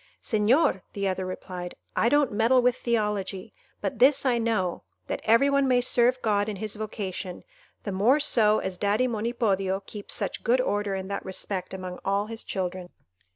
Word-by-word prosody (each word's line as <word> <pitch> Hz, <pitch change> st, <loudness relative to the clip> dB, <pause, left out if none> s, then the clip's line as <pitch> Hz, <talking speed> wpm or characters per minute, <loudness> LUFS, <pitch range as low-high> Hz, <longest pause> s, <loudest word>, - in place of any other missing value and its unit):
"Señor," 215 Hz, -, +2 dB
the 200 Hz, -1 st, -1 dB
other 185 Hz, 0 st, -2 dB
replied, 180 Hz, -1 st, -6 dB, 0.2 s
"I 235 Hz, -, +3 dB
don't 290 Hz, -2 st, +3 dB
meddle 225 Hz, +5 st, +3 dB
with 250 Hz, 0 st, +3 dB
theology; 210 Hz, -6 st, -2 dB, 0.3 s
but 260 Hz, -, -3 dB
this 275 Hz, +2 st, +5 dB
I 245 Hz, -2 st, +2 dB
know, 215 Hz, -6 st, 0 dB, 0.2 s
that -, -, -4 dB
every 230 Hz, +5 st, +5 dB
one 280 Hz, -1 st, +2 dB
may 250 Hz, -1 st, +4 dB
serve 245 Hz, 0 st, +3 dB
God 205 Hz, -1 st, +1 dB
in 210 Hz, -, -4 dB
his 215 Hz, +2 st, -4 dB
vocation, 200 Hz, -4 st, -5 dB, 0.4 s
the 205 Hz, -, -3 dB
more 220 Hz, +10 st, +3 dB
so 220 Hz, -7 st, +3 dB
as 185 Hz, -1 st, -4 dB
daddy 210 Hz, +5 st, +2 dB
Monipodio 210 Hz, -5 st, 0 dB
keeps 205 Hz, -2 st, -4 dB
such -, -, -3 dB
good 245 Hz, +3 st, +3 dB
order 205 Hz, -5 st, 0 dB
in 190 Hz, 0 st, -4 dB
that 200 Hz, -, -3 dB
respect 190 Hz, 0 st, -3 dB
among 185 Hz, -1 st, -6 dB
all 200 Hz, +1 st, 0 dB
his 225 Hz, +1 st, -6 dB
children." 185 Hz, -2 st, -4 dB
210 Hz, 175 wpm, -26 LUFS, 190-240 Hz, 0.4 s, this